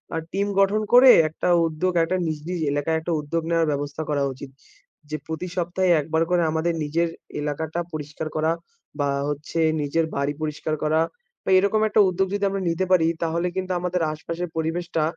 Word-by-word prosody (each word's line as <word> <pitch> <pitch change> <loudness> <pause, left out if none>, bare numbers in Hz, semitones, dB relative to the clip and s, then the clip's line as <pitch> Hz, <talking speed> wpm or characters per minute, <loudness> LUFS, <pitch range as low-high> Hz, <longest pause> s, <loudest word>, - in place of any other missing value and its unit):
আ - - 0
team 200 +1 0
গঠন 200 +2 +3
করে 255 +2 +9 0.2
একটা 160 - -3 0.2
উদ্যোগ, 165 +3 -1
একটা 180 +3 0
নিজ, 155 -1 -2
নিজ 180 -1 -2
এলাকায় 145 +3 0
একটা 170 - -3
উদ্যোগ 165 +3 -2
নেয়ার 165 -1 +2
ব্যবস্থা 145 +1 -3
করা 145 -2 +1
উচিত। 135 +1 -10 0.6
যে 155 - -2
প্রতি 160 +3 -4
সপ্তাহে 180 +1 +1
একবার 160 +2 0
করে 175 -1 +3
আমাদের 160 +2 0
নিজের 165 +3 0 0.3
এলাকাটা 155 +3 -3
পরিষ্কার 150 +1 -5
করা 155 +1 +2 0.5
বা, 145 0 +1 0.2
হচ্ছে 150 +3 -4 0.2
নিজের 155 +3 0
বাড়ি 140 +1 0
পরিষ্কার 155 0 -2
করা, 155 +1 +2 0.4
তো - - -4
এরকম 200 +3 +2
একটা 215 - +4
উদ্যোগ 190 +1 0
যদি 205 0 -1
আমরা 195 0 -3
নিতে 170 +3 0
পারি 170 -3 +5 0.2
তাহলে 170 +2 0
কিন্তু 190 0 -2
আমাদের 180 0 -1
আশপাশের 165 +3 -5
পরিবেশটা 165 0 -1
165 Hz, 180 wpm, -24 LUFS, 155-180 Hz, 0.6 s, করে